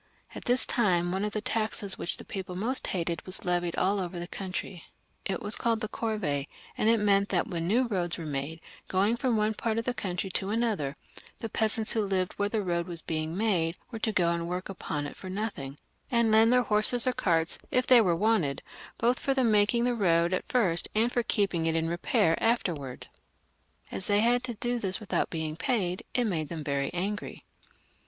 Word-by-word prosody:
At - - -8
this 245 +1 +4
time 175 -7 +2
one 190 +2 -1
of 210 - -1
the 215 - -1
taxes 215 -3 -1
which - - -1
the - - -10
people 185 -2 -6
most 235 +8 -1
hated 170 -2 -2
was 185 - +2
put 180 -5 -2
on 175 -1 +1
all 195 +2 +2
over 180 -1 -4
the 175 0 -5
country; 185 -2 -5 0.4
it 195 - -2
was 205 +1 +4
called 230 -1 0
the 215 - -3
corvee, 210 -13 -2 0.3
and 215 - +2
it 230 0 +4
meant 200 -1 +3
that 180 -3 0
when 170 -3 -2
new 235 +7 +3
roads 180 -7 -1
were 165 - -6
made, 150 +2 -4 0.3
going 200 +5 +2
from 240 -2 0
one 215 +1 +2
part 220 +1 -2
of 230 - -1
the 250 - 0
country 190 -3 -3
to 190 - -1
another, 205 -10 0 0.4
the 225 - -4
peasants 220 +1 +1
who 225 - +1
lived 190 -3 0
where 205 0 -1
the 215 -1 -1
road 170 -1 -1
was 170 -2 -4
being 160 +1 -2
made 180 -6 +1 0.2
were 225 - -5
to 220 - 0
go 175 -5 +2
and 170 0 -2
work 180 +2 -4
upon 150 -6 -4
it 145 - -7
for 185 - -9
nothing, 185 -9 -4 0.3
and 235 -2 +3
lend 220 +2 +6
their 250 0 +4
horses 220 +2 +3
or 255 - +2
carts, 165 -6 +1
if 255 0 +1
they 250 -2 +7
were 180 -5 +2
wanted, 180 -8 +1 0.3
both 240 +2 +2
for 275 - 0
making 215 +1 +3
the 245 0 +2
road 170 -5 +2
at 185 - -2
first 190 -9 +1
and 230 +3 +2
for 245 - +1
keeping 195 -7 0
it 165 - +1
in 165 0 +1
repair 165 -1 +2
afterwards. 165 - -1 0.9
As 190 - 0
they 205 0 +4
had 240 +2 +3
to 240 -2 -5
do 240 +3 -1
this 190 -2 0
without 215 - -1
being 160 -2 -3
paid, 185 -1 -1
it 245 - +3
made 160 -8 -1
them 165 -3 -5
very 140 -1 -1
angry. 195 +4 -4
195 Hz, 210 wpm, -28 LUFS, 170-225 Hz, 0.9 s, they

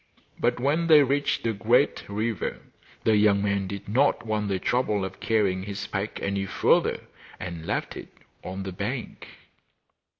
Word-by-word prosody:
But - - +1
when 150 +6 +1
they 155 -3 +8
reached 140 -1 0
a 115 - +1
great 120 +6 +2
river 110 +1 -2 0.5
the 110 - +4
young 105 -1 +4
man 100 -1 0
did 100 +1 -7
not 125 +4 +2
want 105 -1 -1
the 95 -1 0
trouble 105 -1 0
of 95 0 -8
carrying 100 -4 +1
his 100 +1 -5
pack 100 +2 -4
any 100 0 -1
further, - - +2 0.4
and 85 -2 -6
left - - -2
it - - -9 0.3
on 95 +1 -5
the 95 - -5
bank. 110 +7 -5
105 Hz, 160 wpm, -26 LUFS, 95-120 Hz, 0.5 s, they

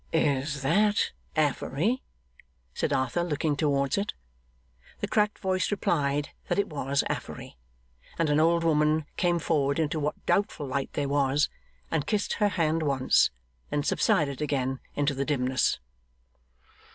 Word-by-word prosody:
'Is 140 -2 0
that 205 +8 +3 0.2
Affery?' 155 - +1 0.7
said - - -1
Arthur, 130 +6 +1
looking 155 -2 0
towards 140 +2 +1
it. 200 - -3 0.8
The - - -2
cracked 210 0 +1
voice 185 -2 0
replied 145 -7 0 0.2
that - - 0
it 200 - +1
was 140 -2 0
Affery: - - -5 0.6
and 165 - +2
an 145 - +3
old 170 +1 +3
woman 155 -1 +2
came 175 -1 +2
forward 145 -4 +1
into 155 -1 0
what 150 0 -3
doubtful 195 -7 +1
light 135 0 -2
there 145 -1 -1
was, 140 +1 +2 0.4
and 145 - 0
kissed 210 -2 0
her 205 - +5
hand 165 -4 +1
once; 135 -4 +3 0.4
then 145 - 0
subsided 140 -2 +1
again 135 -3 -1 0.2
into 145 0 +1
the 135 0 -1
dimness. 130 -3 +1
150 Hz, 140 wpm, -28 LUFS, 140-165 Hz, 0.8 s, her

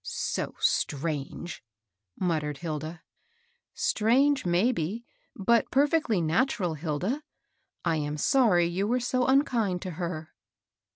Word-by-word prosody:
" - - -61
So - - -3
strange! 150 +3 -1 0.3
" 90 0 -32
muttered 155 -5 -1
Hilda. 155 +1 -5 0.4
" 475 0 -44 0.2
Stringe, 260 +3 +3
maybe, 195 +3 0 0.3
but 230 +4 +2
perfectly 280 - +2
natural, 175 +1 +1
Hilda. 165 - -2 0.6
I 165 -2 +2
am 150 0 -2
sorry 205 - +4
you 180 +4 -1
were 245 +3 +1
so 250 +1 0
unkind 235 -9 +2
to 185 - -4
her." 165 -2 -5
180 Hz, 120 wpm, -28 LUFS, 155-245 Hz, 0.6 s, sorry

